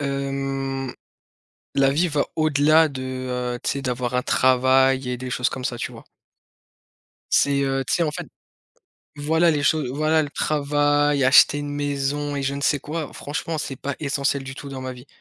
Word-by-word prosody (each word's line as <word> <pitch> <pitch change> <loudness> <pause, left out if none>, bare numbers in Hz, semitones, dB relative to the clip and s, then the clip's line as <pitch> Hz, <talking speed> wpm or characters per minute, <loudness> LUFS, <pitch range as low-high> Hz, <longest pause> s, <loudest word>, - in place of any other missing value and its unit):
hem, 135 -1 -3 0.8
la 135 -1 +4
vie 165 +6 +2
va 145 0 +1
au-delà 155 +1 +4
de, 135 -3 -7 0.5
heu, - - -7
tu - - 0
sais, 140 - -3
d'avoir 125 -1 -2
un 125 - +2
travail 130 0 +3
et 125 - -2
des 130 +1 -6
choses 125 0 0
comme 130 -1 -6
ça, 120 - -2
tu - - -4
vois? - - -13 1.3
C'est, 140 -1 +3
heu, 135 0 0
tu - - +1
sais, 175 - +1
en 155 - +1
fait 150 - -6 0.9
voilà, 160 +3 +3
les 145 -2 0
choses 150 -2 +1
voilà, 155 +3 +2
le 145 - -4
travail, 145 -1 +1
acheter 135 +2 +6
une 145 0 -4
maison 145 0 -2
et 140 - -2
je 135 +1 -1
ne 140 - -5
sais 145 +1 +2
quoi 155 +2 -5
franchement, 155 +3 -4
c'est 135 -2 -4
pas 140 +2 -4
essentiel 140 -1 -1
du 135 0 -7
tout 140 +1 -9
dans 135 -1 -6
ma 130 0 -4
vie. 125 +2 -13
140 Hz, 190 wpm, -23 LUFS, 135-145 Hz, 1.3 s, acheter